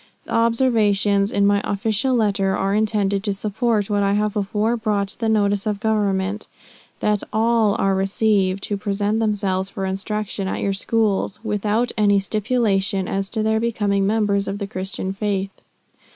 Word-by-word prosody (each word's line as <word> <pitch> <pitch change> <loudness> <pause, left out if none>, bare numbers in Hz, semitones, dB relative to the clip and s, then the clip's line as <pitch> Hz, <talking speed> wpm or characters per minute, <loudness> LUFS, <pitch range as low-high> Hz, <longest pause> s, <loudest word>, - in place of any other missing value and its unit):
The - - -11
observations 220 -4 +2
in 200 0 +2
my 200 0 +3
official 220 +5 0
letter 200 -4 +1
are 195 +1 0
intended 205 -2 +1
to 205 - -1
support 210 +1 -1
what 205 -1 0
I 200 0 +2
have 210 0 0
before 210 +3 0
brought 210 -4 -1
to - - -11
the 225 -1 0
notice 205 -1 +1
of 210 -1 -1
Government, 205 -2 0 0.5
that 210 -1 +1
all 225 -1 +2
are 195 -3 +1
received, 195 0 +1
who 205 - -2
present 205 +2 -1
themselves 195 -3 0
for 195 - -4
instruction 195 +1 -3
at - - -3
your 200 - 0
schools, 210 0 0
without 215 +2 0
any 205 -1 +4
stipulation 205 -2 0
as 195 0 -2
to 220 -2 -1
their 220 0 +2
becoming 205 -4 0
members 205 -2 +1
of 195 - -3
the 200 - -4
Christian 190 0 -4
faith. 195 -1 -3
205 Hz, 165 wpm, -21 LUFS, 195-220 Hz, 0.5 s, any